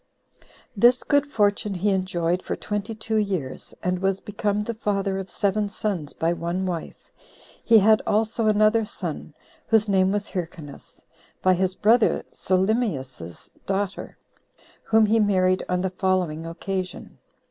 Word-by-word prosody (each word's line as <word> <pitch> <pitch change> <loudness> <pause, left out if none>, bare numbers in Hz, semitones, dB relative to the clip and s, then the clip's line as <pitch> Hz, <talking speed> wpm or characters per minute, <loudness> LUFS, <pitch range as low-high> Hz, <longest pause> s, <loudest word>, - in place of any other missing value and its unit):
6. - - -25 0.3
This 240 +5 +4
good 285 -1 +2
fortune 205 -4 0
he 200 +3 +1
enjoyed 180 -2 0
for - - -4
twenty 210 +2 -4
two 220 0 -2
years, 190 -11 -3
and 180 0 0
was 195 0 0
become 205 0 -2
the 235 - -3
father 200 -3 -1
of 190 - -7
seven 205 0 0
sons 195 -8 -3
by 165 +1 0
one 175 +2 -3
wife; 175 -3 -6 0.5
he 230 - +6
had 215 +1 +5
also 220 +1 +1
another 215 +1 +4
son, 165 -7 -6 0.3
whose 220 -1 +3
name 190 -1 +3
was 205 0 -2
Hyrcanus, 165 -6 -8 0.4
by 185 - +5
his 185 +1 0
brother 220 +3 +3
Solymius's 185 - -2 0.2
daughter, 195 0 -3 0.6
whom 220 0 +3
he 220 +2 +3
married 185 -3 +2
on 180 0 0
the 190 -1 -1
following 180 -4 -1
occasion. 185 +2 -5
195 Hz, 145 wpm, -24 LUFS, 180-215 Hz, 0.6 s, he